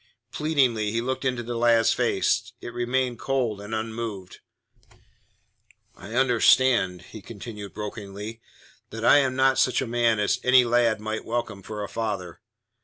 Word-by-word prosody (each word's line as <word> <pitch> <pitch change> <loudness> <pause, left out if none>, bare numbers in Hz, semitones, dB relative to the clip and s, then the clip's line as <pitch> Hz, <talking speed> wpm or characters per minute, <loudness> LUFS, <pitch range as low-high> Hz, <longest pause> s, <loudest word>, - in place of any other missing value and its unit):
Pleadingly 130 -9 +1
he 115 - -1
looked 130 +3 -3
into 125 -2 -1
the 120 +1 -5
lad's 115 -1 +3
face. - - 0
It 120 - -8
remained 120 0 -1
cold 120 -7 -1
and 105 +2 -5
unmoved. 110 -4 -5 1.6
"I 110 - -9
understand," 120 -7 +3
he 110 - -9
continued 105 -1 -9
brokenly, 105 +1 -7 0.5
"that 115 +1 -5
I - - +7
am 130 -2 0
not 130 0 +3
such 125 - +2
a 130 - -1
man 120 -1 +1
as 105 - +1
any 125 -1 +5
lad 120 -2 +2
might 110 +1 -4
welcome 115 -4 -3
for 105 +2 -6
a - - -4
father. 100 -7 -4
115 Hz, 150 wpm, -25 LUFS, 105-125 Hz, 1.6 s, I